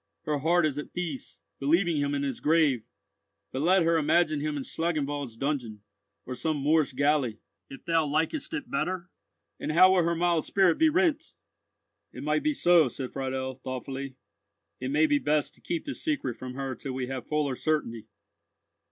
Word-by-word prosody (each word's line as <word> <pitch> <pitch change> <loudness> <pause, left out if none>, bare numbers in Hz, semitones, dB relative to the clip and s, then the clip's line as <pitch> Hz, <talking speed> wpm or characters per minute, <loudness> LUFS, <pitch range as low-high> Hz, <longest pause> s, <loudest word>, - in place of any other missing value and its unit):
Her 150 -1 -1
heart 170 +3 +3
is 145 -1 -1
at 150 - -8
peace, 165 - -5 0.2
believing 165 +4 +2
him 145 0 0
in 140 - -1
his 135 -3 -3
grave; 150 -7 +2 0.6
but 130 - -3
let 180 +3 +4
her 165 0 +3
imagine 155 0 +2
him 150 0 -2
in 140 - -3
Schlangenwald's 145 -7 -2
dungeon, 125 -7 -3 0.4
or 130 - -5
some 155 +4 -1
Moorish 150 0 +2
galley, 140 -4 +1 0.3
if 135 - -11
thou 165 -2 +2
likest 160 - -1
it 265 -6 -6
better, 185 -8 -2 0.5
and - - -2
how 185 +3 +7
will 185 - +4
her 170 0 +1
mild 170 -1 +2
spirit 190 -4 +2
be 320 - +5
rent!" 320 -2 +1 0.8
"It - - -8
might - - +1
be 300 0 0
so," 175 - +5
said 130 +1 -6
Friedel, 130 -1 -3
thoughtfully. 130 +1 -5 0.6
"It 130 - -3
may 150 +3 +3
be 145 -2 +2
best 150 0 0
to - - -21
keep 170 - -3
this 280 - -6
secret 285 - -1
from 125 0 -8
her 135 -1 -3
till 130 +2 -6
we 130 0 -2
have 130 0 -6
fuller 150 -3 0
certainty." 125 -7 -2
150 Hz, 180 wpm, -28 LUFS, 135-170 Hz, 0.8 s, how